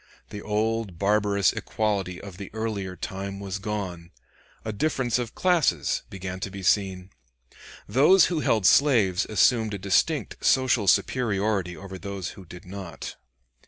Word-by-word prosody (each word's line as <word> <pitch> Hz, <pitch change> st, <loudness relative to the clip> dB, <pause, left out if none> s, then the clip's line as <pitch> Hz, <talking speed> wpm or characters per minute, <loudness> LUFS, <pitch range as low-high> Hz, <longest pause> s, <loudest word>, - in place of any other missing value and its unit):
The 105 Hz, -, -6 dB
old 105 Hz, -3 st, -1 dB
barbarous 100 Hz, 0 st, +2 dB
equality 100 Hz, -4 st, -2 dB
of 100 Hz, -3 st, -10 dB
the 100 Hz, -1 st, -7 dB
earlier 105 Hz, -4 st, -3 dB
time 95 Hz, +3 st, -5 dB
was 100 Hz, 0 st, -5 dB
gone; 95 Hz, -5 st, -5 dB, 0.6 s
a 110 Hz, -, -3 dB
difference 125 Hz, -1 st, 0 dB
of 120 Hz, -2 st, -5 dB
classes 180 Hz, -4 st, +2 dB
began 95 Hz, -1 st, -6 dB
to 100 Hz, -, -4 dB
be 95 Hz, 0 st, -8 dB
seen. 95 Hz, -1 st, +1 dB, 0.8 s
Those 150 Hz, -, +6 dB
who 170 Hz, -3 st, -1 dB
held 110 Hz, -9 st, +1 dB
slaves 110 Hz, -9 st, +4 dB
assumed 110 Hz, +1 st, +2 dB
a -, -, -4 dB
distinct 100 Hz, -, 0 dB
social 130 Hz, -6 st, +3 dB
superiority 100 Hz, -5 st, +1 dB
over 95 Hz, -1 st, -9 dB
those 100 Hz, -2 st, -5 dB
who 95 Hz, -, -12 dB
did 90 Hz, +3 st, -12 dB
not. 95 Hz, -2 st, -7 dB
100 Hz, 140 wpm, -26 LUFS, 95-110 Hz, 0.8 s, Those